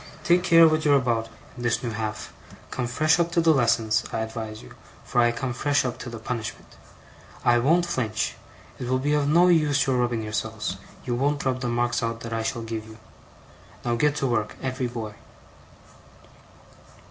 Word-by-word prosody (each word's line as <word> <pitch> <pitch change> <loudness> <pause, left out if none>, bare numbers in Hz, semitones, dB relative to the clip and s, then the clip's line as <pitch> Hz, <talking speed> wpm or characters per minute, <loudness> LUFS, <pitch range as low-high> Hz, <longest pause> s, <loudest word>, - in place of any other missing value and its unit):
Take 175 +1 +4
care 165 -2 +7
what 155 0 +1
you're 145 -2 +5
about, 120 -4 +1 0.3
in 120 - -9
this 120 +1 0
new 120 - -2
half. 110 0 -4 0.4
Come 125 -2 -2
fresh 155 +7 +2
up 170 0 +1
to 175 - +3
the 165 -1 +5
lessons, 115 -4 +2
I 110 - -2
advise 110 -1 -6
you, - - -13 0.3
for 120 - +1
I 120 0 +4
come 120 +1 -3
fresh 145 +2 +1
up 125 - -3
to 125 - -6
the 115 - -7
punishment. 110 0 -6 0.7
I 120 0 +5
won't 165 +8 +3
flinch. 115 -9 -1 0.5
It 125 - -4
will 130 - +2
be 145 +3 0
of 145 -1 +2
no 170 +4 +5
use 150 -5 +3
your 130 -2 +1
rubbing 120 -2 0
yourselves; 105 -1 -3 0.3
you 125 - -1
won't 140 +4 0
rub 130 -1 0
the 125 - -1
marks 120 0 0
out 115 0 -3
that 115 0 -5
I 115 - -1
shall 115 +1 -3
give 110 -1 -5
you. 110 0 -12 0.9
Now 120 - +1
get 145 +4 +2
to 140 - -1
work, 110 -4 -1
every 130 -1 -2
boy! 115 -3 -6
120 Hz, 195 wpm, -25 LUFS, 115-145 Hz, 0.9 s, care